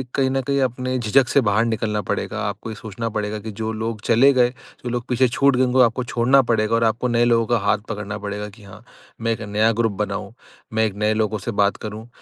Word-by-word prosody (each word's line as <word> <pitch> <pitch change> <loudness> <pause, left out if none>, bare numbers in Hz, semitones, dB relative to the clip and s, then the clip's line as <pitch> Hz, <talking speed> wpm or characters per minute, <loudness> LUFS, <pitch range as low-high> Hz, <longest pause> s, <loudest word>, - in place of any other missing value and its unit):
कहीं 135 -1 +2
न 135 0 0
कहीं 140 0 +1
अपने 130 0 -1
झिझक 125 +3 +3
से 140 - +4
बाहर 110 0 +2
निकलना 110 -2 -1
पड़ेगा। 110 +1 -2
आपको 100 +2 -6
ये 110 - -6
सोचना 110 +2 -5
पड़ेगा 105 -1 -3
कि 110 +1 -7
जो 110 +2 -4
लोग 110 0 -4
चले 120 +6 +5
गए, 125 -2 +4
जो 125 0 -11
लोग 120 -1 -3
पीछे 130 +1 +3
छूट 140 +3 +2
गए 130 - +3
उनको 130 0 +3
आपको 125 +1 +2
छोड़ना 125 +3 +3
पड़ेगा 115 -2 +1
और 115 - +2
आपको 115 +2 +1
नए 120 -1 +2
लोगों 115 -1 +3
का 120 +1 +1
हाथ 105 - +3
पकड़ना 105 -1 -4
पड़ेगा 105 0 -5
कि 105 +1 -17
हाँ, 100 +2 -13 0.4
मैं 115 0 0
एक 110 - -7
नया 105 +1 +1
ग्रुप 115 -2 +2
बनाऊँ - - -4 0.4
मैं 110 0 +2
एक 105 -3 -3
नए 105 0 +3
लोगों 110 0 0
से - - 0
बात 100 - +1
करूँ। 110 +2 -7
115 Hz, 240 wpm, -21 LUFS, 105-125 Hz, 0.4 s, चले